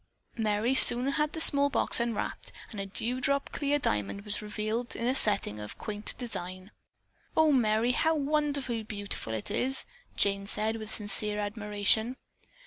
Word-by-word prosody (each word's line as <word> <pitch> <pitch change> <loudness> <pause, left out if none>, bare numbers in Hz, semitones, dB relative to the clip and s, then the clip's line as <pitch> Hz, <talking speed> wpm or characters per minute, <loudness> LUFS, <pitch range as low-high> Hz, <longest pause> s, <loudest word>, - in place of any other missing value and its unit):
Merry 220 +2 -1
soon 250 0 +10
had 300 +2 -1
the 320 - -5
small 285 -2 +3
box - - -1
unwrapped 235 -2 -4 0.2
and 210 - -8
a 195 - -5
dew 240 +6 -3
drop 280 +1 -1
clear 290 0 -1
diamond 105 - -3
was 210 0 -4
revealed 215 +3 -4
in 230 - -4
a 250 - +1
setting 200 - +1
of 105 0 -9
quaint 210 0 -5
design. 185 -5 -7 0.7
"Oh, 315 -1 +4
Merry, 230 -2 +1
how 320 +5 0
wonderfully 285 -5 -2
beautiful 205 - -6
it 110 - -4
is!" 265 +1 0 0.3
Jane 200 0 0
said 215 +2 -3
with 215 -1 -9
sincere 210 0 +2
admiration. 210 +3 -2
220 Hz, 155 wpm, -28 LUFS, 205-265 Hz, 0.7 s, soon